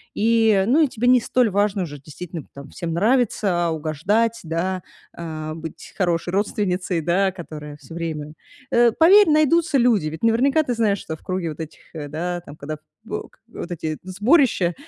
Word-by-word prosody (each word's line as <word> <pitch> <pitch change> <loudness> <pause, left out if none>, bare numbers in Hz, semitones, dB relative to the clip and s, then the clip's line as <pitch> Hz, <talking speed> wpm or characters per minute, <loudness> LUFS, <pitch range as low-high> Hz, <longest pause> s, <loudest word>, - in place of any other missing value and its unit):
и 225 +2 +2 0.3
ну, 280 +7 +4
и - - +3
тебе 245 -1 -2
не 250 0 +6
столь 245 0 +2
важно 200 0 +1
уже 145 -4 -7
действительно 155 +3 -8
там 140 0 -10
всем 165 -1 -5
нравится, 200 -4 +1
угождать, 190 +10 0
да, 175 +3 -2 0.3
а, 155 -2 -6
быть 160 -1 -9
хорошей 175 -2 0
родственницей, 190 -3 0
да, 190 +4 +2
которая 150 -5 -9
всё 160 - -13
время 155 -3 -4 0.4
Э, 240 0 +5
поверь, 365 - +6
найдутся 310 +1 +3
люди. 230 -9 +3
Ведь 160 +5 -7
наверняка 265 +7 +3
ты 250 - -2
знаешь, 210 -3 +1
что 160 - -6
в - - -26
круге 185 -2 -2
вот 155 - -8
этих, 160 -1 -7 0.2
э, 150 -2 -5
да, 175 +4 -3
там 145 -4 -12
когда 155 +1 -6 0.3
в - - -5
к - - -29
вот - - -8
эти 160 -2 -3
сборища, 205 - +2
180 Hz, 175 wpm, -22 LUFS, 160-230 Hz, 0.4 s, не